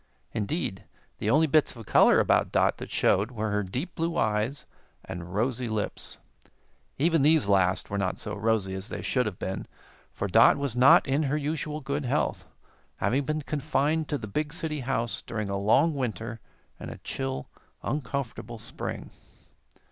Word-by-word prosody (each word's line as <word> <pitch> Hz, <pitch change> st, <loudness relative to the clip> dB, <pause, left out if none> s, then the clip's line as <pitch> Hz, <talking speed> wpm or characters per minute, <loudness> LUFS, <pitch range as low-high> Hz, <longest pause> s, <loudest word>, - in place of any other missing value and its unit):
Indeed, 105 Hz, -, -2 dB, 0.3 s
the -, -, -1 dB
only 155 Hz, +3 st, +5 dB
bits 155 Hz, -2 st, +2 dB
of 115 Hz, -2 st, -10 dB
color -, -, +5 dB
about -, -, +2 dB
Dot -, -, +2 dB
that -, -, -7 dB
showed 100 Hz, +4 st, +2 dB
were 110 Hz, -3 st, -3 dB
her 105 Hz, 0 st, +1 dB
deep 125 Hz, -, -4 dB
blue 165 Hz, +1 st, -2 dB
eyes 110 Hz, +6 st, 0 dB, 0.4 s
and 90 Hz, 0 st, -7 dB
rosy 120 Hz, +2 st, 0 dB
lips. 110 Hz, -1 st, -4 dB, 0.8 s
Even 165 Hz, +2 st, +3 dB
these 150 Hz, -4 st, +4 dB
last 95 Hz, -1 st, +2 dB
were 100 Hz, -, -1 dB
not 95 Hz, -2 st, -1 dB
so -, -, -4 dB
rosy 105 Hz, -2 st, 0 dB
as 95 Hz, +3 st, -5 dB
they -, -, -5 dB
should 125 Hz, -4 st, +1 dB
have 95 Hz, -4 st, -5 dB
been, 95 Hz, +1 st, -4 dB, 0.4 s
for 100 Hz, -, -3 dB
Dot 115 Hz, +7 st, +6 dB
was 140 Hz, -4 st, -2 dB
not 125 Hz, +2 st, +7 dB
in 135 Hz, +3 st, +2 dB
her 150 Hz, -, +1 dB
usual 150 Hz, 0 st, -3 dB
good 140 Hz, +1 st, -2 dB
health, 125 Hz, -, 0 dB, 0.5 s
having 135 Hz, +3 st, 0 dB
been 155 Hz, +1 st, -2 dB
confined 150 Hz, +1 st, 0 dB
to 145 Hz, -, 0 dB
the 115 Hz, -, -6 dB
big 150 Hz, +9 st, -2 dB
city 160 Hz, -2 st, -3 dB
house 120 Hz, -3 st, -2 dB
during 110 Hz, -3 st, -4 dB
a -, -, -1 dB
long 110 Hz, +11 st, +4 dB
winter 120 Hz, -4 st, -3 dB, 0.4 s
and -, -, -7 dB
a -, -, -8 dB
chill, 65 Hz, 0 st, -4 dB, 0.3 s
uncomfortable 135 Hz, -5 st, -3 dB
spring. 115 Hz, +2 st, -6 dB
120 Hz, 170 wpm, -27 LUFS, 105-145 Hz, 0.8 s, not